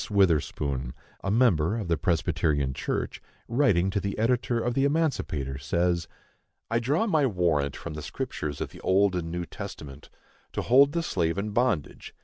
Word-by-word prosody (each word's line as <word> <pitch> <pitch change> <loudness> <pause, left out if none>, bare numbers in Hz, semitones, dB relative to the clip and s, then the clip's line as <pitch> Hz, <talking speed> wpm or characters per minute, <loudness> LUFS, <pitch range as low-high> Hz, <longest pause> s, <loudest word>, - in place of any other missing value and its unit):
Witherspoon, 75 - +1 0.3
a 100 - -1
member 105 -5 +3
of 105 -5 -4
the 85 - +2
Presbyterian 75 -3 0
Church, - - -3 0.3
writing 105 -8 +2
to 100 - 0
the 100 0 -3
editor 120 +1 +1
of 120 +1 -1
the 135 - +1
Emancipator, 140 - 0
says: 85 +5 0 0.6
I 115 - +3
draw 145 - +1
my 155 -10 +3
warrant 85 - +1
from 85 - -7
the 75 - -6
Scriptures 75 0 -4
of - - -2
the - - -12
Old 95 0 +3
and 85 -2 -2
New 85 +1 -3
Testament, 75 -9 -9 0.4
to - - -2
hold 140 +4 +5
the 170 - 0
slave 85 - 0
in 105 +2 -2
bondage. 105 - -1
95 Hz, 165 wpm, -27 LUFS, 75-120 Hz, 0.6 s, hold